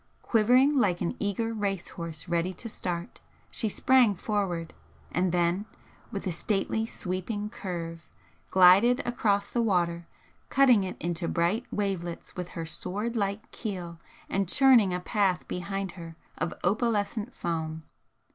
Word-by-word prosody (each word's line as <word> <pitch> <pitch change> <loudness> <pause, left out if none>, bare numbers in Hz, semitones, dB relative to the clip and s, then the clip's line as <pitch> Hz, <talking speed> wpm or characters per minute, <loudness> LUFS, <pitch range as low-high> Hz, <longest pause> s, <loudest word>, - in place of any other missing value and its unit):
Quivering 250 +6 +4
like 180 -7 +2
an 170 - -1
eager 220 +3 -1
race 200 -4 -2
horse 165 -1 -7
ready 170 +2 0
to 230 - -7
start, 175 -5 -4 0.3
she 220 - -1
sprang 245 -1 +4
forward; 180 -5 -2 0.4
and 180 +1 +1
then, 175 +4 +1 0.4
with 200 - -4
a 185 - 0
stately 210 +5 0
sweeping 205 +2 -4
curve, 165 -3 -6 0.4
glided 195 +8 +6
across 205 -4 0
the 240 - +1
water, 170 -5 +1 0.4
catting 255 -6 +5
it 185 - -5
into 170 0 -2
bright 180 +9 +1
wavelets 190 -5 -3
with 180 -1 -5
her 165 - -3
sword 205 +8 -3
like 200 0 -2
keel 180 -6 -5 0.3
and 195 -2 -1
churning 250 -7 +6
a 180 - -1
path 190 -3 0
behind 195 +1 -3
her 165 -2 -10 0.2
of - - -1
opalescent 215 +3 0
foam. 160 -2 -3
195 Hz, 135 wpm, -28 LUFS, 175-215 Hz, 0.4 s, glided